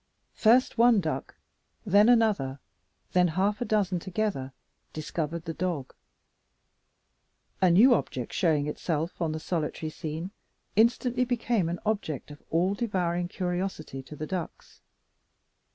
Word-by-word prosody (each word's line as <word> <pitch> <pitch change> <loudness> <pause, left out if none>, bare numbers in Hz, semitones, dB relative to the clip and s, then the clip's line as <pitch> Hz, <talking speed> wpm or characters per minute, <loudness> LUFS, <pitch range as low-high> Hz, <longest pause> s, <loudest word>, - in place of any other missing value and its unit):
First 235 +1 +3
one 235 -2 +6
duck, 160 -4 -3 0.5
then 205 +3 +5
another, 210 - +3 0.5
then 180 -1 +4
half 195 +7 0
a - - 0
dozen 195 -5 +1
together, 185 -7 -2 0.4
discovered 160 +1 -4
the 165 - -3
dog. 165 -6 -3 1.7
A 185 - +5
new 220 +9 +7
object 125 - -2
showing 155 -6 +2
itself 160 +3 -3
on 165 -2 0
the 155 - -3
solitary 155 -1 -3
scene 160 +3 -5 0.4
instantly 240 +3 +3
became 235 -7 0
an 175 - -3
object 180 - -2
of 145 - -12
all 175 +4 +2
devouring 180 -5 -1
curiosity 180 -6 -3
to 135 +3 -11
the 155 - -5
ducks. 180 0 -6
180 Hz, 125 wpm, -28 LUFS, 155-210 Hz, 1.7 s, new